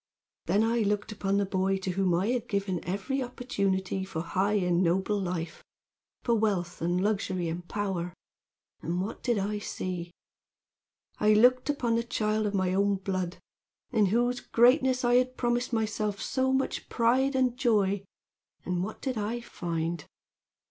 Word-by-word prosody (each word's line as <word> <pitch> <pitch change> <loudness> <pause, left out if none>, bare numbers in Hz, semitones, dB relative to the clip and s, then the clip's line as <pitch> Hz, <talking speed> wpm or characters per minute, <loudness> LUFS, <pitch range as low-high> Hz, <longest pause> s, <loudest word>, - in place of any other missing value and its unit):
"Then 200 +6 +3
I 230 +1 +2
looked 210 0 0
upon 200 -1 0
the 200 - +2
boy 190 0 0
to 190 -1 -3
whom 185 -1 +1
I 190 +6 +1
had 245 -1 -1
given 195 -3 -1
every 200 - -2
opportunity 195 -7 -1
for 160 -4 -4
high 195 +4 0
and 180 -3 +2
noble 190 +4 +1
life, 175 -3 -4 0.6
for 235 - +2
wealth 200 -6 0
and 175 +2 +1
luxury 190 -4 0
and 170 +2 -5
power, 190 -4 -2 0.7
and 175 +2 -2
what 195 +4 -4
did 240 -3 +1
I 205 +1 -1
see? 180 -3 -4 1.1
I 215 0 +5
looked 250 +5 +4
upon 240 -5 +1
the 235 - 0
child 215 -2 0
of 205 - -2
my 185 -1 +1
own 200 +1 +2
blood, 185 -2 -3 0.5
in 215 -5 +3
whose 240 +4 +1
greatness 255 +1 +3
I 240 0 +5
had 255 0 +1
promised 240 +1 0
myself 215 -3 -1
so 260 0 0
much 265 0 -1
pride 255 +4 +2
and 255 -2 +2
joy, 205 -6 +2 0.6
and 180 0 -1
what 215 - -6
did 255 -5 -1
I 220 +3 -2
find? 170 -6 -3
205 Hz, 160 wpm, -29 LUFS, 185-235 Hz, 1.1 s, I